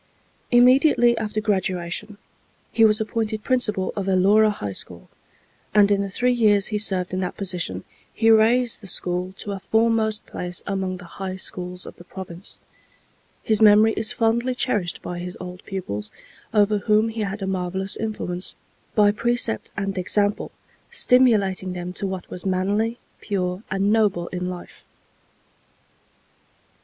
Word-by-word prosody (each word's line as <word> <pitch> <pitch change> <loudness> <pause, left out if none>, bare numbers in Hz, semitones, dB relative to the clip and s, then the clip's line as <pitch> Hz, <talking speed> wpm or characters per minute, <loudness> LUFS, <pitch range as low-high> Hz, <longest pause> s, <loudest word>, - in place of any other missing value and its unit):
Immediately 245 0 +5
after 215 -1 -2
graduation 190 -1 -2 0.5
he 225 - +3
was 215 0 +5
appointed 220 0 -2
principal 210 -7 0
of 195 -2 -3
Elora 200 +3 +4
High 105 - -4
School, - - -5 0.7
and 205 -1 +6
in 200 -1 +3
the 200 - -3
three 250 +6 +1
years 210 -4 +3
he 210 - +1
served 185 -4 0
in 185 - -1
that 185 -1 -3
position 180 -3 -3 0.3
he 225 0 +3
raised 230 +2 +3
the 200 - -10
school 180 0 -2
to 205 - -5
a 195 - -4
foremost 220 0 +1
place 180 -1 -4
among 190 -2 -2
the 180 - -11 0.2
High 190 -1 -3
Schools 180 -1 -4
of - - -11
the - - -13
Province. 180 0 -8 0.9
His 220 -1 +1
memory 215 +1 +6
is 220 - +6
fondly 240 +1 0
cherished 210 -10 -1
by 175 -1 -5
his 180 +1 -6
old 180 0 -8
pupils, 105 - -5 0.4
over 210 -1 +3
whom 215 +3 +2
he 225 0 -4
had 200 0 -3
a - - -1
marvellous 190 +1 -2
influence, 195 -5 -4 0.4
by 205 -2 +5
precept 235 - 0
and 195 -1 -2
example 205 +3 0 0.4
stimulating 200 -7 +3
them 180 0 -5
to 195 - -3
what 190 -2 -5
was 180 - -5
manly, 200 +5 0 0.2
pure 185 -2 -2
and 195 +2 +1
noble 200 -6 +1
in 180 0 -4
life. 180 -1 -8
200 Hz, 150 wpm, -23 LUFS, 185-220 Hz, 0.9 s, and